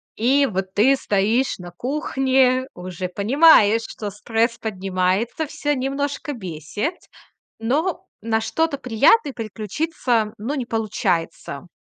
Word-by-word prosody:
И 275 +5 +3
вот 190 -3 -3
ты 245 +8 +4
стоишь 220 +2 +1
на 175 -1 -9
кухне, 260 - +1
уже 180 0 -5
понимаешь, 225 - +5
что 210 - -6
стресс 225 +3 -1
поднимается, 195 - -1
всё 295 -1 -2
немножко 280 +3 -2
бесит, 195 - -4 0.6
но 295 +11 -1 0.2
на 220 +1 0
что-то 305 +5 -1
приятное 275 - +3
переключиться, 225 - -2
ну, 245 +8 -3
не 260 -4 -3
получается. 190 -8 -2
230 Hz, 110 wpm, -22 LUFS, 200-275 Hz, 0.6 s, понимаешь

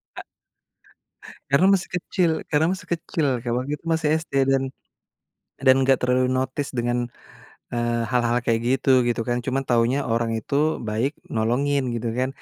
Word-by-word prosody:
A - - -7 1.3
Karena 165 +7 +5
masih 190 -1 0
kecil 180 0 0 0.2
karena 155 +2 +3
masih 190 - -9
kecil 160 -1 -2
kayak 120 0 -2
waktu 130 +3 -3
itu - - -30
masih 160 -2 0
SD - - -15 0.2
dan 135 0 +2 0.9
dan 130 0 +5
enggak 130 0 +4
terlalu 125 0 +2
notice 130 +2 -1
dengan, 120 0 0 0.8
eee, 120 -1 0
hal-hal 120 -1 +2
kayak 115 -1 +1
gitu, 130 0 +3
gitu 120 -1 0
kan. 120 0 0
Cuma 135 +2 -2
taunya 120 +3 +2
orang 115 0 0
itu 110 +5 -5 0.3
baik 120 +7 -1 0.2
nolongin 135 +6 +1
gitu 115 +1 -3
kan, 130 - +1
130 Hz, 155 wpm, -23 LUFS, 120-140 Hz, 1.3 s, Karena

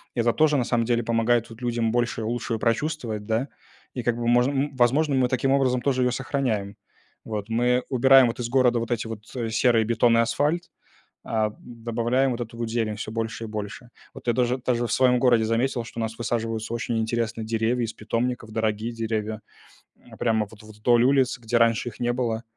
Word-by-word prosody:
И - - -2
это 115 0 +3
тоже, 150 -2 +3
на 125 - +1
самом 115 -1 +1
деле, 120 0 +1
помогает 115 +1 +1
вот 115 +2 -12
людям 115 -2 0
больше 120 -1 0
и - - -3
лучше 115 -1 -2
прочувствовать, 115 -3 -1
да, 115 +5 0 0.5
и 125 - -4
как 120 0 0
бы 120 0 -2
можно, 120 +3 +4
м 140 0 -1
возможно, 135 +4 +2
мы 130 -1 +2
таким 130 +1 +1
образом 130 -2 +2
тоже 130 0 +1
её 125 0 +2
сохраняем, 115 -7 -2 0.5
вот. 105 -2 -5
Мы 125 +2 +1
убираем 130 0 +6
вот 115 +1 -4
из 120 - -3
города 125 -2 +3
вот 115 +1 -4
эти 115 -1 -1
вот 110 -1 -7 0.3
серые 115 -1 +3
бетон 115 +1 +3
и - - +4
асфальт, 150 +8 0 0.6
а, 110 -1 0
добавляем 120 +2 -1
вот 120 0 -3
эту 115 0 -7
вот 115 -1 -3
зелень 110 -3 -1
всё 110 0 -6
больше 115 0 -3
и 115 - -5
больше. 105 +3 -6 0.3
Вот - - -11
я 120 - +2
даже 125 +1 +1
даже 120 -1 -1
в - - -5
своём 125 -1 +3
городе 120 -3 +4
заметил, 120 +2 0
что 115 +1 -9
у - - -1
нас 115 0 -3
высаживаются 115 0 -2
очень 115 0 -2
интересные 115 0 -2
деревья 115 +2 0
из 110 - -6
питомников, 115 +1 -3
дорогие 110 +1 -1
деревья, 110 -2 -3 0.6
э, - - -16
прямо 110 -2 +1
вот 110 -1 -15
вдоль 110 +3 +2
улиц, 130 -1 +3
где 120 0 0
раньше 115 +1 +2
их 120 - -15
не 120 0 +1
было, 120 -2 -2
120 Hz, 205 wpm, -25 LUFS, 115-125 Hz, 0.6 s, убираем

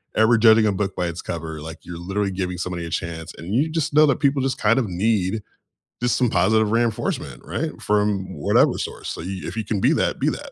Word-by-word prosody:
ever 110 +2 +5
judging 110 0 +6
a - - +3
book 100 -1 -2
by 90 -1 -1
its 85 +1 -5
cover, 80 -2 -5
like, 80 +1 -8
you're 85 -1 -8
literally 95 +3 -1
giving 90 -1 -3
somebody 85 -2 -3
a 85 - -7
chance, 80 -1 -4
and 95 +7 -4
you 150 +5 +2
just 155 -2 -1
know 155 0 +7
that 140 - +1
people 140 -2 +2
just 135 -1 -1
kind 115 +3 +3
of 115 - -1
need 100 +2 0 0.6
just 125 - +2
some 125 -3 +2
positive 110 +4 +2
reinforcement, 115 -1 -1
right? - - -2
From 105 -2 0
whatever 70 - +3
source, - - -5
so - - -5
you 95 +1 -5
if 95 +6 -6
you 110 - -2
can 100 -3 -2
be - - +4
that, - - 0
be - - +2
that. - - -6
105 Hz, 235 wpm, -22 LUFS, 90-115 Hz, 0.6 s, know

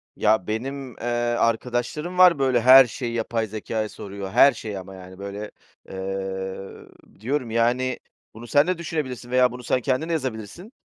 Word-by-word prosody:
Ya 110 -3 +2
benim, 130 +3 -4
eee, 120 - -7 0.3
arkadaşlarım 125 +9 -1
var 180 -5 +7
böyle 130 -3 +2
her 130 +2 +9
şeyi 120 0 -5
yapay 115 -1 -1
zekâya 110 +1 -4
soruyor, 100 -1 -7
her 140 - +7
şeyi 105 -3 -6
ama, 95 +1 -10
yani, 95 0 -12
böyle, 100 +1 -6 0.4
eee, 95 0 -5 0.5
diyorum 125 0 -2
yani 120 +2 +1 0.3
bunu 120 +2 -11
sen 145 +7 +3
de 185 -2 0
düşünebilirsin 135 -7 -5
veya 125 -1 +4
bunu 125 0 -9
sen 125 - 0
kendin 140 +5 -1
de - - 0
yazabilirsin. 130 - -5
120 Hz, 160 wpm, -24 LUFS, 105-135 Hz, 0.5 s, her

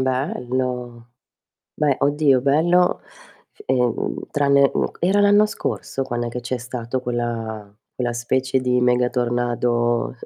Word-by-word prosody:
Bello. 125 -2 -3 0.6
Beh, 145 -3 +1
oddio, 140 -2 +3
bello, 175 +6 +3 0.6
ehm, 125 -3 -1
tranne 140 -1 +3
uhm, - - 0
era 190 +4 +3
l'anno 205 +1 +5
scorso 135 -8 -4
quando 120 -2 -3
è - - -2
che 125 +1 -5
c'è 125 +1 -3
stato 125 +1 -4
quella 115 -4 -4 0.2
quella 120 -2 -2
specie 130 +3 0
di 125 -1 +1
mega 125 0 +3
tornado 120 -1 0
125 Hz, 125 wpm, -21 LUFS, 120-140 Hz, 0.6 s, l'anno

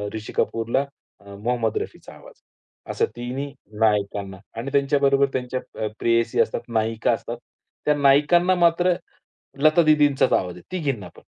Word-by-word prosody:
ऋषी 110 0 -7
कपूरला 115 +5 0 0.3
अ, 100 0 -12
मोहम्मद 115 +1 -1
रफीचा - - -7
आवाज - - -15
आहे. - - -81 0.4
असं - - +1
तिन्ही 130 +4 -5 0.3
नायकांना 100 -3 0 0.2
आणि 130 +4 -5
त्यांच्याबरोबर 140 0 +3
त्यांच्या 130 0 -2 0.3
अ, - - 0
प्रेयसी 115 0 +1
असतात. 115 - -1
नायिका 115 0 0
असतात. 120 +1 -5 0.5
त्या 150 - +4
नायकांना 150 +6 +4
मात्र 175 +1 +3 0.7
लता 155 +2 +6
दीदींचाच 150 -4 +3
आवाज 90 -1 0
आहे. 90 - -12
तिघींना 140 - -2
पण. - - -15
130 Hz, 145 wpm, -23 LUFS, 110-145 Hz, 0.7 s, लता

